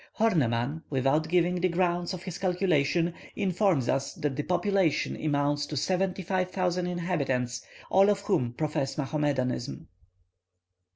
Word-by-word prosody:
Horneman, 145 - +1
without 140 +3 +1
giving 175 +1 +2
the 185 - +3
grounds 175 0 0
of 185 -1 -6
his 185 -2 -6
calculation, 175 -3 +1 0.2
informs 185 - +1
us 135 +2 -1
that 145 -2 -2
the 150 - -1
population 180 0 +1
amounts 145 -1 0
to 150 - -4
seventy 185 +4 0
five 185 0 0
thousand 180 -1 -1
inhabitants, 140 -9 -1 0.3
all 195 +2 +6
of 200 -1 +1
whom 125 - 0
profess 150 -1 -2
Mohammedanism. 140 -3 -2
170 Hz, 130 wpm, -28 LUFS, 140-185 Hz, 0.3 s, all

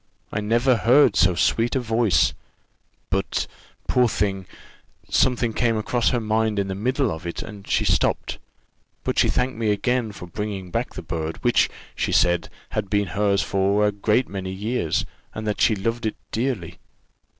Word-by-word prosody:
I 105 - -1
never 120 +4 +3
heard 125 0 +5
so 90 -1 +4
sweet 115 +8 +1
a - - +3
voice; 115 -3 +2 0.8
but, 95 +1 0 0.4
poor 125 -2 +3
thing, 95 -3 -1 0.6
something 125 -3 +2
came 115 -1 +1
across 115 +2 +1
her 120 - +1
mind 110 -1 0
in 100 -1 0
the - - -1
middle 125 +4 0
of 80 +1 -6
it, 85 - -4
and 105 -3 -10
she - - +2
stopped; - - +1 0.6
but - - 0
she - - +4
thanked 125 -2 0
me 110 -2 +1
again 115 +2 0
for 95 - -9
bringing 95 0 -5
back - - -2
the - - -6
bird, 80 0 -3
which, - - +3 0.3
she - - -1
said, 85 -1 +2 0.2
had 105 -2 -2
been 100 -1 +1
hers 100 +3 +1
for 100 +2 +2
a 105 - +3
great 105 +5 +1
many 95 -1 -5
years, 100 -3 -1 0.3
and 110 - -5
that 105 -1 -2
she 110 - +4
loved 115 +3 -2
it 110 - -3 0.2
dearly. 110 -9 -2
105 Hz, 170 wpm, -23 LUFS, 95-115 Hz, 0.8 s, heard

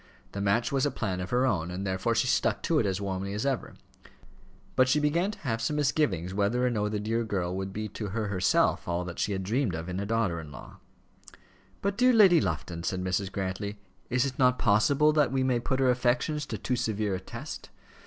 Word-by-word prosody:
The 100 - -4
match 100 +4 +1
was 135 -1 +1
a 145 - +3
plan 95 -9 -3
of 90 - -4
her 125 +1 +2
own, 90 -10 0
and 90 +2 -4
therefore 95 +5 0
she 115 - +2
stuck 125 - +1
to 160 -2 +2
it 110 - +1
as 95 0 -1
warmly 100 0 -3
as 105 - -2
ever, 135 -3 -2 1.0
but 130 0 +4
she 150 - +3
began 165 +6 +1
to 210 - -7
have 115 -5 -2
some 115 +6 -1
misgivings 140 - 0
whether 105 +5 +1
or 125 - +2
no 105 -2 0
the 105 0 -2
dear 115 +3 -1
girl 95 -5 -2
would 95 0 -4
be 110 +2 -4
to 105 +1 -5
her 105 +2 -2
herself 95 -2 +2
all 90 0 -1
that 85 -1 -7
she 105 - 0
had 95 -1 -3
dreamed 110 - 0
of 80 +1 -5
in 90 +1 -3
a 100 - -2
daughter 110 -7 0
in 75 -3 -9
law. - - -11 1.1
"But, 200 +1 -1
dear 250 0 +5
Lady 190 -8 +6
Lufton," 85 -1 -3
said 90 +1 -2
Mrs. 95 +1 -1
Grantly, 100 +2 -3 0.3
"is 125 +2 +2
it 135 -1 -5
not 125 -1 +4
possible 140 +8 +3
that 150 -5 +3
we 135 -1 +1
may 130 -2 +2
put 130 +2 -1
her 130 -1 +4
affections 125 +4 0
to 110 - -4
too 125 +6 -1
severe 110 -3 -1
a 95 - -2
test? 95 - -8
110 Hz, 230 wpm, -28 LUFS, 95-130 Hz, 1.1 s, Lady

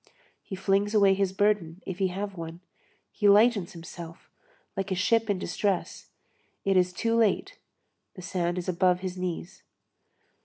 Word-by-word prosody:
He 195 - -7
flings 200 +2 +1
away 200 -2 +6
his 195 -1 0
burden, 195 -3 0
if 185 -1 -5
he 190 - +3
have 195 +2 -4
one, 165 0 -7 0.5
he 205 -2 +2
lightens 205 -2 +4
himself, 170 0 -10 0.4
like 195 0 -2
a - - +1
ship 225 +4 +2
in 200 - +2
distress; 185 +1 -2 0.6
it 195 -1 +2
is 180 -1 +3
too 230 +6 -1
late, 225 -3 +1 0.6
the 185 - -9
sand 175 -1 -1
is 180 - -4
above 180 0 +2
his 185 -1 -4
knees. 180 0 -5
190 Hz, 155 wpm, -27 LUFS, 180-205 Hz, 0.6 s, away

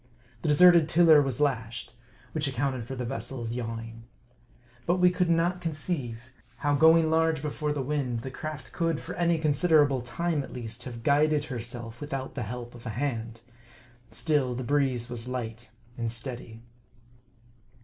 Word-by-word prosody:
The - - -3
deserted 170 +1 +7
tiller 160 -3 +7
was 135 -3 -1
lashed; 120 -6 -1 0.4
which 155 -2 -1
accounted 130 -2 -2
for 135 - -5
the 125 -1 -3
vessel's 120 -2 -4
yawing. 115 -1 -5 0.8
But 175 - +3
we 180 -1 +4
could 180 -1 0
not 170 +2 +2
conceive, 140 -7 -3 0.2
how 145 -1 0
going 160 +2 +5
large 160 -2 +2
before 150 0 -2
the 145 -2 -2
wind, 130 -4 -1
the 130 - -6
craft 155 +2 -7
could, 165 -3 0
for - - -7
any 170 -1 +2
con 155 -1 +1
siderable 145 -4 +3
time, 160 +5 -1
at - - -9
least, 120 0 -6
have 120 -3 -7
guided 150 +2 +3
herself 120 -3 -6
without 135 -2 -4
the 130 - -4
help 120 +2 -6
of 120 0 -10
a 110 -1 -5
hand. 115 -4 -3 0.7
Still, 125 +3 0
the 130 - -4
breeze 130 -3 +1
was 120 -1 -2
light 120 -2 -5 0.3
and 115 -1 -1
steady. 120 -1 -6
135 Hz, 160 wpm, -28 LUFS, 120-155 Hz, 0.8 s, deserted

